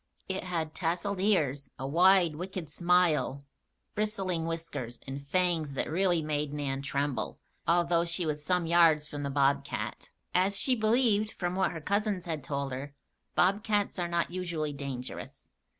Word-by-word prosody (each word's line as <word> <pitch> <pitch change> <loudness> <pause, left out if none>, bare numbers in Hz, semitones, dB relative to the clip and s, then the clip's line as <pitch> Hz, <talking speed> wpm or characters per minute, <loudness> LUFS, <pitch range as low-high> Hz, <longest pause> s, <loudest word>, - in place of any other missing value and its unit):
It 190 -1 -3
had 165 -4 -2
tasseled 180 +4 -1
ears, 150 -9 +1
a 135 - -5
wide, 175 +1 +5
wicked 180 -2 -6
"smile," 170 -5 +2 0.5
bristling 195 -6 -1
whiskers, 165 -8 -5
and 140 +1 -7
fangs 170 -4 +1
that 135 - -1
really 175 -1 +2
made 150 -1 -1
Nan 135 -2 -2
tremble, 140 -3 -2 0.3
although 170 0 +3
she 170 +1 -1
was 150 -1 -2
some 180 +1 +1
yards 165 -3 +4
from 145 -1 -6
the 140 - -2
bobcat. 140 -6 0 0.2
As 190 +2 +3
she 260 - +4
believed, 220 -1 +3
from 175 -1 -3
what 190 -1 +2
her 165 - -6
cousins 200 +1 0
had 160 -5 -3
told 140 0 -3
her, 140 +2 -6 0.4
bobcats 205 +1 +2
are 175 - 0
not 170 0 0
usually 170 -5 -2
dangerous. 135 -3 -6
170 Hz, 150 wpm, -30 LUFS, 145-185 Hz, 0.5 s, wide